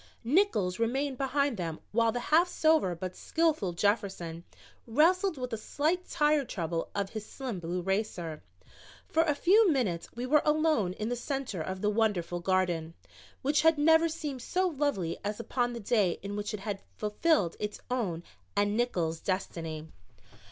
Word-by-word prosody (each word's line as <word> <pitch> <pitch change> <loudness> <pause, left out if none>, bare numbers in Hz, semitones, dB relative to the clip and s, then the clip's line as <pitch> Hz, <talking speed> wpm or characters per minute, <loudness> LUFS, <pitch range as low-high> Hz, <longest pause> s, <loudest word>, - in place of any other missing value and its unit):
Nickols 230 - +2
remained 265 +3 0
behind 280 -2 +1
them 165 -3 -4
while 230 +1 +3
the 245 - -2
half 340 +3 +6
sober 315 - +3
but 185 +2 -5
skillful 315 - 0
Jefferson 175 -3 -1 0.4
wrestled 335 - +3
with 250 -2 -4
a - - -1
slight 320 +10 -1
tire 300 -2 +3
trouble 170 -8 -3
of 200 -1 -1
his 215 -2 -5
slim 240 -3 -5
blue 175 +1 -3
racer. 185 -5 -2 0.6
For 320 - +2
a 310 -3 +2
few 395 +7 +5
minutes 220 - 0
we 240 +1 -3
were 295 +3 +4
alone 305 - +2
in 215 +4 -3
the 245 - 0
center 250 - -3
of 185 +3 -4
the 210 - +2
wonderful 200 -6 0
garden, 175 -3 0 0.5
which 290 +3 +3
had 320 -1 +5
never 320 +2 +5
seemed 300 -5 -5
so 370 +9 0
lovely 280 - -1
as 210 +2 -3
upon 240 +1 -1
the 235 - -5
day 205 -4 +1
in 200 0 -4
which 205 0 -3
it 200 - -8
had 205 -1 -4 0.2
fulfilled 210 - +1
its 210 0 -4
own 190 -10 -1 0.3
and 205 +1 +2
Nickols' 175 -9 0
destiny. 165 -4 -3
225 Hz, 165 wpm, -30 LUFS, 185-290 Hz, 0.6 s, half